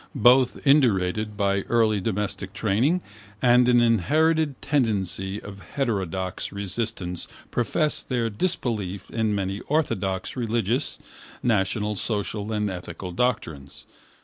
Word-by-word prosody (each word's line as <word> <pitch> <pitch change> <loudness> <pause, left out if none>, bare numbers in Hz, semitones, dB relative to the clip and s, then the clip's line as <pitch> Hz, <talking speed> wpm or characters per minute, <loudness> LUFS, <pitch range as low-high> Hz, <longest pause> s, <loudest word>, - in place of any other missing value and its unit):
Both 125 +1 +5
indurated 110 -7 +3
by 100 -1 +1
early 110 -3 +3
domestic 100 -1 -3
training 115 - +1 0.4
and 125 0 +5
an 120 -1 +5
inherited 145 - +2
tenacity 100 - 0
of 100 -1 -10
heterodox 95 - -2
resistance 95 -3 -2 0.2
professed 150 +5 0
their 120 -3 +1
disbelief 105 - -2
in 110 -2 0
many 100 0 -2
orthodox 100 -11 -1
religious, 120 +1 0 0.5
national, 105 -1 +1
social 105 0 -2
and 105 -1 0
ethical 90 0 -7
doctrines. 85 - -2
105 Hz, 105 wpm, -25 LUFS, 95-125 Hz, 0.5 s, Both